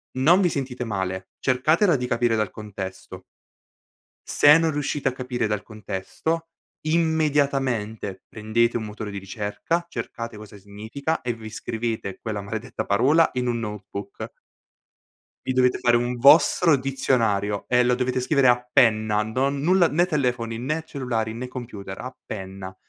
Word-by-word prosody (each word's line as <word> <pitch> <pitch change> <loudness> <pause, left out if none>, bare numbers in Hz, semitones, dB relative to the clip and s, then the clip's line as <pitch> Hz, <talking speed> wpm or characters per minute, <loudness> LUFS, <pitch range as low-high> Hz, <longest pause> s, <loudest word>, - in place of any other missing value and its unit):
non 160 +9 +5
vi 180 - +3
sentite 130 -4 -3
male, 95 -3 -3
cercatela 155 +8 +3
di 125 -1 -2
capire 115 -1 +1
dal 105 -3 0
contesto. 95 -3 -8 1.1
Se 145 +1 +7
non 165 -1 +1
riuscite 145 -1 -2
a 130 - +1
capire 125 -3 -2
dal 105 -3 -2
contesto, 115 - -4 0.3
immediatamente 140 - 0
prendete 115 +2 0
un 115 - -1
motore 105 0 -6
di 100 - -5
ricerca, 105 - -3
cercate 115 -8 -6
cosa 105 0 -11
significa 110 +10 -4
e 120 -1 -2
vi 110 -1 -9
scrivete 110 -2 -4
quella 105 -2 -4
maledetta 110 +5 -5
parola 135 +11 +4
in 125 -1 -1
un 120 -1 0
notebook. 105 -2 -7 1.1
Vi 130 - 0
dovete 125 0 +3
fare 120 -1 +3
un 120 +1 0
vostro 155 +5 +6
dizionario 115 -7 0
e 125 0 +4
lo 125 0 +3
dovete 130 0 0
scrivere 135 +1 +3
a 125 0 +2
penna. 110 -4 +4
Non 135 +5 -1
nulla, 175 +2 +4
né 170 +4 +2
telefoni, 125 -8 -1
né 155 +7 -2
cellulari, 115 -7 -3
né 125 +3 -5
computer, 115 -7 -7
a 130 +1 -6
penna. 95 -2 -7
120 Hz, 145 wpm, -24 LUFS, 105-140 Hz, 1.1 s, Se